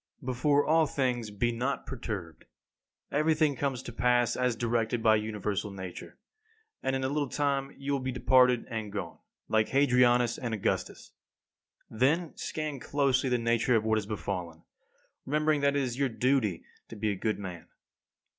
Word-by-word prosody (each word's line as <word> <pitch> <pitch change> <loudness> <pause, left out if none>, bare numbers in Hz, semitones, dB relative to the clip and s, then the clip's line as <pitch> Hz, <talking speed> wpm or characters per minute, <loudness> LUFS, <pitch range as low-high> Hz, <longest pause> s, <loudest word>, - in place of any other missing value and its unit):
5. - - -13
Before 140 +3 +2
all 160 0 +4
things, 125 -5 -1
be 110 +4 0
not 125 +4 -2
perturbed. 105 - -6 0.7
Everything 155 0 +2
comes 130 -1 -2
to 120 - -8
pass 120 0 +2
as 125 -2 +1
directed 115 0 -1
by 110 -1 +6
universal 105 -1 -2
Nature, 95 -2 -8 0.6
and 135 - 0
in 130 - -2
a - - +1
little 145 0 -1
time 140 -1 -1
you 140 +1 -4
will 140 - +1
be 130 0 -3
departed 125 -1 +4
and 110 -4 -5
gone, 95 -5 -5 0.3
like 110 -1 +2
Hadrianus 125 -3 +3
and 120 -3 -2
Augustus. 105 - -2 0.8
Then, 150 +9 +1
scan 155 -3 -4
closely 135 -1 +1
the 125 - +2
nature 115 +1 +2
of 110 - +2
what 110 0 +2
has 100 - -7
befallen, 90 -6 -4 0.6
remembering 150 +1 +1
that 140 0 +2
it 140 - +2
is 125 0 -4
your 140 -2 +2
duty 120 -7 +1 0.2
to - - -10
be 105 0 -1
a - - -2
good 110 +3 -1
man. 90 -4 -7
125 Hz, 165 wpm, -29 LUFS, 110-140 Hz, 0.8 s, by